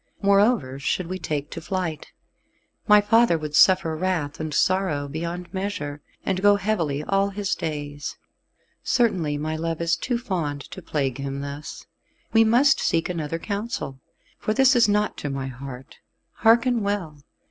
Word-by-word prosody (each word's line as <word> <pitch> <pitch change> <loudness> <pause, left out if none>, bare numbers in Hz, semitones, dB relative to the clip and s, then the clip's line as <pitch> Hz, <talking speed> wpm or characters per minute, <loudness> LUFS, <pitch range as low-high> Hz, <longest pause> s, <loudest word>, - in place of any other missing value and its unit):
Moreover 200 - +2
should 175 +5 -1
we 185 +2 -5
take 150 -3 -3
to 165 - -6
flight, 165 -2 -3 0.8
my 210 -1 +7
father 225 -3 +4
would 150 -1 -6
suffer 185 -1 +5
wrath 160 -4 -2
and 155 -1 -3
sorrow 165 -3 +1
beyond 170 +5 -5
measure, 190 -7 -4 0.2
and 190 -1 0
go 205 0 +6
heavily 170 -9 -1
all 195 +3 +1
his 200 0 -2
days. 145 -2 -5 0.6
Certainly 185 -12 +1
my 155 +2 -3
love 165 0 -3
is 170 0 +1
too 245 -2 -2
fond 170 - -3
to 190 - -8
plague 140 -6 -2
him 140 0 -4
thus, 140 +1 -7 0.4
and - - -37
we 225 0 +6
must 245 +7 +4
seek 165 +1 0
another 165 -2 -3
counsel, 200 - -4 0.4
for 215 - -1
this 265 0 +5
is 235 -3 +5
not 210 +1 +1
to 145 - -4
my 135 -1 -3
heart. 130 0 -9 0.4
Hearken 235 +1 +4
well. 190 -8 -3
170 Hz, 160 wpm, -24 LUFS, 145-205 Hz, 0.8 s, my